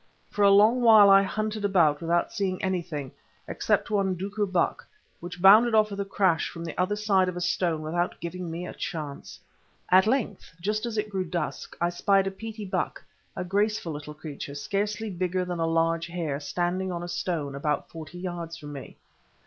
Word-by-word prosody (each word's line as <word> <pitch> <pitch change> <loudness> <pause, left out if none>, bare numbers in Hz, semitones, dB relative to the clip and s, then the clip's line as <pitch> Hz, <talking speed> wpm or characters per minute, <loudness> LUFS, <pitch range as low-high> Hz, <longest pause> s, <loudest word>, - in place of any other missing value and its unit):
For 205 - -3
a 200 - +7
long 215 +5 +5
while 215 -4 +8
I 195 0 +8
hunted 215 +2 -3
about 170 -7 +3
without 170 +1 0
seeing 190 -3 -1
anything, 170 -7 -3 0.4
except - - 0
one 195 -3 +1
duiker 200 +2 -3
buck, 180 -2 0 0.3
which 175 +1 -8
bounded 215 +5 +7
off 215 -1 +4
with 200 - -5
a 200 - -1
crash 190 -4 +1
from 170 0 -8
the 165 - -6
other 185 +4 0
side 195 -3 +2
of 180 - -6
a - - -2
stone 170 -3 0
without 175 +3 -2
giving 175 +1 -5
me 170 +2 -5
a - - -7
chance. 150 -4 -6 0.5
At 185 +2 +6
length, 220 -8 -2
just 215 +6 -1
as 225 -2 -4
it 210 0 -2
grew 190 -2 -1
dusk, 170 -2 -4
I 170 - +1
spied 195 +2 +2
a 195 - -2
Petie 220 +1 -7
buck, 190 - -3 0.3
a - - -3
graceful 200 -1 0
little 150 +1 -8
creature, 145 -2 -7
scarcely 205 +7 -2
bigger 180 0 -1
than 175 -1 -4
a 165 - +1
large 165 0 +1
hare, 165 -5 -3
standing 175 +5 -2
on 175 -1 -4
a - - -5
stone, 160 -5 -3
about 145 +1 -2
forty 165 +1 -9
yards 175 -2 -5
from 145 -3 -9
me. 135 -2 -9
180 Hz, 195 wpm, -26 LUFS, 165-200 Hz, 0.5 s, while